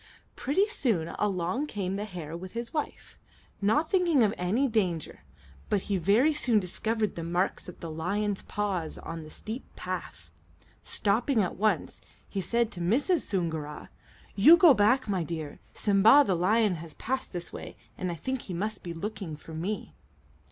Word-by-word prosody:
Pretty 375 +9 +2
soon 225 - 0
along 200 - 0
came 195 -6 -3
the 205 +1 -3
hare 170 -6 -7
with 185 +2 -8
his 235 0 -4
wife, 300 -2 -5 0.4
not 285 +11 +2
thinking 345 -9 +4
of 210 -1 +2
any 210 +10 +1
danger; 185 - -1 0.5
but 200 - +1
he 200 - 0
very 210 - +4
soon 245 -7 +2
discovered 215 +3 -1
the 165 - -5
marks 175 +3 -1
of 180 - -12
the 165 - -5
lion's 200 +5 -1
paws 195 -6 -3
on 165 0 -6
the 155 - -10
steep 220 - -6
path. - - -6 0.5
Stopping 220 +3 +1
at 180 - -3
once, 215 +1 0 0.3
he 195 - -3
said 235 +5 0
to 175 - -5
Mrs. 275 - +2
Soongoora: 160 -6 -3 0.4
"You 300 +13 +8
go 340 -5 +8
back, 225 +4 +3
my 190 -4 0
dear. 160 -2 -5
Simba, 215 +7 +6
the 190 - +1
lion, 195 +2 +2
has 160 -2 -10
passed 260 +2 -3
this 175 -2 -6
way, - - -8 0.2
and 185 -1 -3
I - - -4
think 260 +8 -3
he 180 - -6
must 210 +3 -3
be 170 -1 -6
looking 195 -2 -5
for 160 +2 -12
me." 185 +7 -4
200 Hz, 170 wpm, -28 LUFS, 175-235 Hz, 0.5 s, You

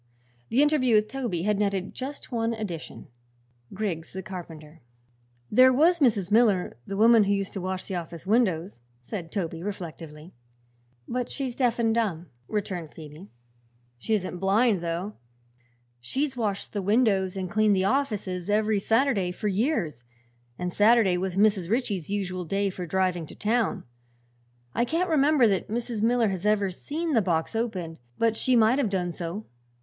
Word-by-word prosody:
The 265 +5 +4
interview 280 -6 +3
with 215 0 +3
Toby 240 -11 -3
had 210 0 +1
netted 195 -2 -1
just 270 +2 -7
one 230 -1 0
addition 190 -7 -6 0.7
Griggs 185 -6 -4
the 190 0 -5
carpenter. 165 -4 -9 0.7
"There 255 +4 +7
was 330 +7 +4
Mrs. 210 - +2
Miller, 210 -5 +3
the 195 - -4
woman 225 0 +6
who 200 - +1
used 195 -1 -2
to 195 - -4
wash 185 0 -3
the - - -5
office 170 -1 -6
windows," 185 - +1 0.2
said 165 - -7
Toby 165 -5 -3
reflectively. 165 -4 -7 0.7
"But 250 0 -2
she's 265 -3 -3
deaf 245 -3 +1
and 225 -2 +2
dumb," 180 - -1 0.2
returned 185 -7 -4
Phoebe. 155 +4 -11 0.7
"She 220 - 0
isn't 185 -3 -3
blind, 200 +1 +2
though. 175 +5 -4 0.8
She's 265 - -2
washed 210 -5 -3
the 205 - -1
windows 200 -3 +2
and 185 -1 -3
cleaned 215 +1 +3
the 190 0 +1
offices 200 -7 -1
every 215 0 +2
Saturday 225 -4 +1
for 210 +3 -3
years, 195 - -1 0.5
and 180 0 -3
Saturday 210 -3 +4
was 180 0 -2
Mrs. 200 -3 +2
Ritchie's 210 - -1
usual 185 -3 -2
day 195 +3 -1
for 180 -1 -6
driving 180 -2 0
to - - -10
town. 225 +1 0 0.9
I - - +1
can't 335 +7 0
remember 290 -4 +4
that 195 -2 0
Mrs. 230 -1 -3
Miller 230 -1 +3
has 190 -2 -4
ever 205 -2 +2
seen 315 - -3
the 230 - +4
box 170 +1 -1
opened, 185 - -3 0.2
but 225 -1 +2
she 255 +3 +2
might 230 +3 +4
have 250 -7 +1
done 180 -3 -1
so." 175 +5 -5
200 Hz, 160 wpm, -26 LUFS, 180-230 Hz, 0.9 s, There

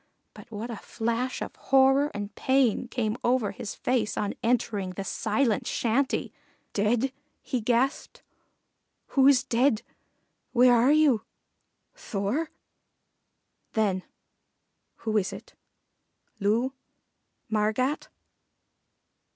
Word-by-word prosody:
But 235 - -13
what 225 +2 -5
a 225 - -5
flash 235 +4 -2
of - - -8
horror 270 +2 +4
and 205 0 -5
pain 260 -3 +2
came 225 -2 -2
over 240 -4 +2
his 240 -5 -6
face 245 -4 -1
on 205 - -1
entering 210 -5 0
the 195 - -5
silent 220 +3 0
shanty! 250 +4 0 0.4
"Dead?" 225 +5 +1 0.3
he 255 - -2
gasped. 245 +5 0 0.9
"Who's 270 -1 +5
dead 245 -2 +2 0.7
where 250 0 +6
are 240 +3 +5
you? 295 -8 +4 0.7
Thor?" 255 - -2 1.2
Then, 200 -4 +1 1.0
"Who 220 -1 +1
is 195 -3 0
it? - - -10 0.9
Loo? 225 +6 +1 0.7
Margat?" 220 +6 0
235 Hz, 100 wpm, -27 LUFS, 215-260 Hz, 1.2 s, where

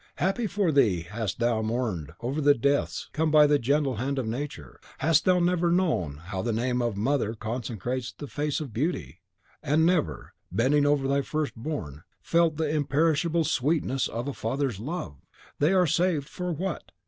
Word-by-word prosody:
Happy 195 +5 0
for 200 -5 +1
thee 115 - +3
hadst 105 +4 -4
thou 120 -2 +1
mourned 110 - -2
over 135 +6 -2
the 145 0 +5
deaths 140 +4 0
which - - -28
come 160 +1 +1
by 150 -1 +7
the 145 0 +3
gentle 140 0 +1
hand 135 +5 -2
of 130 - -1
Nature, 110 - -5 0.2
hadst 160 +1 +3
thou 185 -1 +4
never 175 -1 +2
known 160 - +1
how 90 +4 -5
the 115 - -1
name 125 +2 0
of 120 -4 -1
mother 115 0 0
consecrates 120 +2 -4
the 145 - -9
face 145 0 -2
of 140 -8 -6
Beauty, 115 - -2 0.4
and 155 +3 +2
never, 175 -3 0 0.2
bending 145 +5 +3
over 145 -2 +2
thy 140 +1 +2
first 150 +1 -2
born, 110 - -5 0.2
felt 165 -2 +2
the 160 -1 0
imperishable 155 +3 +1
sweetness 135 -2 0
of 120 +4 -4
a 140 - -2
father's 130 -2 -2
love! 115 - -5 0.4
They 150 +4 +3
are 185 -2 +4
saved, 165 -2 +1
for 180 +1 -4
what? 175 +2 -4
140 Hz, 180 wpm, -27 LUFS, 115-155 Hz, 0.4 s, by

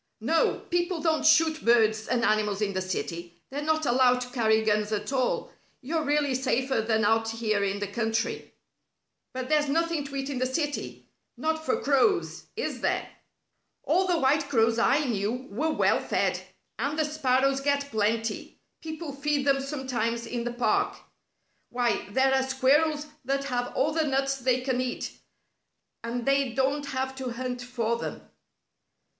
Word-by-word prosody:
"No. 315 +9 +1
People 350 0 0
don't 315 -1 +1
shoot 315 0 +4
birds 220 -2 +3
and 240 -1 0
animals 210 -2 +1
in 205 -2 -1
the 185 - -1
city. 175 -2 -5
They're 285 +2 -3
not 315 +1 0
allowed 250 0 +4
to 250 0 -6
carry 220 -3 +2
guns 210 0 +1
at 210 +5 -2
all. 255 -2 0 0.3
You're 315 +4 -2
really 290 -1 +1
safer 260 -1 0
than 220 -1 +1
out 225 +1 +2
here 220 -2 0
in 200 0 -1
the 205 - -2
country." 225 +2 -2 0.8
"But 255 0 -5
there's 300 0 +2
nothing 330 0 0
to 275 0 -8
eat 270 +1 -3
in 260 - -3
the 255 - +1
city 290 +2 -3 0.3
not 315 0 -1
for 265 - 0
crows. 295 +8 +1
Is - - -3
there?" - - 0 0.7
"All 375 +1 +2
the 355 -2 +2
white 285 0 +2
crows 230 -3 +3
I 275 +5 +3
knew 235 +2 -2
were 295 +10 -1
well 310 - +2
fed. - - 0 0.4
And 295 +2 -1
the 310 - +2
sparrows 275 -2 +1
get 280 0 0
plenty. 220 +1 -1 0.2
People 315 -2 -6
feed 285 0 -1
them 275 -1 +3
sometimes 260 -4 -2
in 235 0 -4
the 240 - -1
park. 245 - +1 0.7
Why, 240 -5 -1
there 265 +5 +3
are 265 - +3
squirrels 285 +4 +2 0.2
that 275 +2 -1
have 245 -3 -2
all 275 +4 +2
the 315 0 0
nuts 275 0 0
they 255 -1 +1
can 255 -1 0
eat, 255 -1 -3 0.9
and 235 +1 -3
they 275 -3 +2
don't 275 +3 0
have 265 -1 -2
to 255 -2 -4
hunt 250 0 -4
for 235 -2 -1
them." - - -6
260 Hz, 165 wpm, -27 LUFS, 230-290 Hz, 0.9 s, shoot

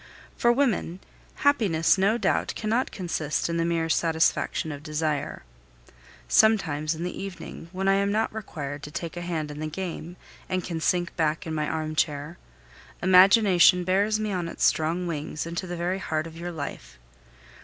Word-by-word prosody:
For 235 - +3
women, 240 -9 0 0.5
happiness 200 - +4
no 200 +4 +2
doubt - - 0
cannot 230 +4 0
consist 165 -6 -2
in 170 - -1
the 165 - +1
mere 165 -1 0
satisfaction 160 -1 +1
of 145 -1 -7
desire. 150 - -2 0.8
Sometimes, 155 - +3
in 165 - -5
the 180 - -4
evening, 185 -3 -8
when 190 +1 -2
I 195 - +5
am 200 0 +1
not 220 +1 0
required 145 -9 -6
to 150 - -8
take 165 +2 -5
a 175 - -5
hand 160 -4 -3
in 150 - -8
the 155 - -3
game, 175 0 -6 0.3
and 185 -1 -1
can 165 -2 -4
sink 175 +1 0
back 155 -1 0
in 160 - -4
my 150 -1 -1
armchair, 155 0 -2 0.6
imagination 185 -1 +6
bears 200 +4 +2
me 215 -1 -2
on 180 -3 -2
its - - -1
strong 165 +3 +1
wings 155 -2 -4
into 170 +2 -4
the 175 0 -5
very 180 +3 -1
heart 155 -3 -2
of 165 -1 -10
your 175 +1 -5
life. 145 - -7
170 Hz, 170 wpm, -26 LUFS, 155-190 Hz, 0.8 s, imagination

